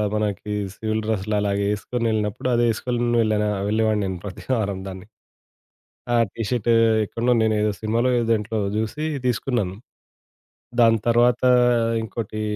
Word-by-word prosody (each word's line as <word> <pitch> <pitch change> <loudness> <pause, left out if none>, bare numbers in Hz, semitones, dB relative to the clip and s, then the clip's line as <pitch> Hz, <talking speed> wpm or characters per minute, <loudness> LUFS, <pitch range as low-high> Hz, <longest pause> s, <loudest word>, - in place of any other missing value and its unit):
మనకి 105 0 -2 0.2
సివిల్ 110 0 -2
డ్రెస్సులలాగ 105 -1 -1
ఏసుకొని 115 +3 -3
ఎళ్ళినప్పుడు 105 +2 -2
అదేసుకొలిని 120 +1 0
వెళ్ళాను 110 -1 +1
ఆహ్, 100 -1 -2
వెళ్ళేవాడిని 110 -1 +1
నేను 95 -1 -3
ప్రతివారం 100 0 -2
దాన్ని. 95 0 -8 1.1
ఆ - - +4 0.2
టీ 115 - -5
షర్టు 120 -1 +1 0.3
ఎక్కడో 115 +4 -1
నేను 110 0 +2
ఏదో 105 0 +1
సినిమాలో 115 +3 +1
ఏదో 115 - 0
దేంట్లో 110 0 -1 0.2
జూసి 110 +8 -2 0.2
తీసుకున్నాను. 120 -6 -1 1.1
దాని 115 -1 +5
తర్వాత 120 +1 +3 0.6
ఇంకోటి 110 -1 -5
110 Hz, 125 wpm, -23 LUFS, 105-120 Hz, 1.1 s, దాని